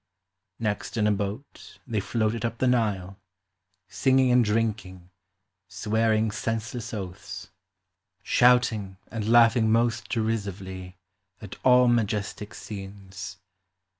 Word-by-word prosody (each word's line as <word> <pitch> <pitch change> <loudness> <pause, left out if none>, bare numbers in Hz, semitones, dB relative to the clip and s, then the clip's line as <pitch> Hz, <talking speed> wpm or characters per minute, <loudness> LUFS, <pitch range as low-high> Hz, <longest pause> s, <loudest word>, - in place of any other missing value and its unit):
" 95 0 -56
Next 110 0 -3
in 105 - +2
a 105 - +4
boat 105 +6 -5
they 115 -4 -1
floated 110 +2 -1
up 115 0 -2
the 130 - 0
Nile, 105 -6 0 0.7
Singing 130 +3 +3
and 125 0 +5
drinking, 105 -5 -2 0.6
swearing 110 +2 +1
senseless 115 +2 -3
oaths, 95 -4 -7 0.7
Shouting, 120 -6 +3
and 110 -2 -3
lauglii 115 +1 +6
ng 110 0 +2
most 115 +1 +1
derisively 95 -5 -3 0.4
At 105 -3 -9
all 125 -1 +6
majestic 105 -3 -1
scenes. 95 -2 -8
110 Hz, 110 wpm, -26 LUFS, 100-115 Hz, 0.7 s, lauglii